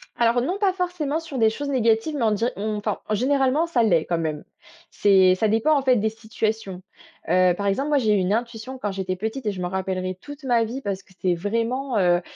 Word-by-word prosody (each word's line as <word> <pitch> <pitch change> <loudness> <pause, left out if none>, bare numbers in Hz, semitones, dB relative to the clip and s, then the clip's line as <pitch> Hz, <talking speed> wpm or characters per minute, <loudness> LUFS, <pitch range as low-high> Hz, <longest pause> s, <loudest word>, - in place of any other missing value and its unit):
Alors 235 +1 +2
non, 355 +10 -1
pas 390 -3 +2
forcément 350 -5 -2
sur 300 -5 -6
des 220 -1 +5
choses 285 +6 -5
négatives, 235 +2 +1
mais 270 - -1
on 220 - +3
dir 230 +4 0
on 210 +1 -2
enfin, 210 - -2
généralement, 270 +6 +2
ça 335 -8 +1
l'est 175 -8 +3
quand 170 -1 -1
même. 155 -2 -3 0.5
C'est, 190 -2 +4
ça 215 +4 +1
dépend, 225 +8 +3
en - - +1
fait, 255 -2 +3
des 220 +1 +1
situations. 220 -3 -4 0.5
Heu, 185 -1 +4
par 200 - -4
exemple, 270 +9 0
moi, 295 - +3
j'ai 220 -6 +2
eu - - +3
une 185 0 0
intuition 235 +3 -3
quand 210 -5 -3
j'étais 190 -1 -3
petite 220 +6 -4
et 210 - +1
je 185 -2 -6
m'en 180 - -1
rappellerai 185 0 -3
toute 290 0 -10
ma 240 -3 +3
vie 240 +5 -5
parce 195 -4 -4
que 190 - -23
c'est 180 -1 +1
vraiment, 230 +7 -2
heu 175 -2 +3
220 Hz, 235 wpm, -23 LUFS, 195-265 Hz, 0.5 s, des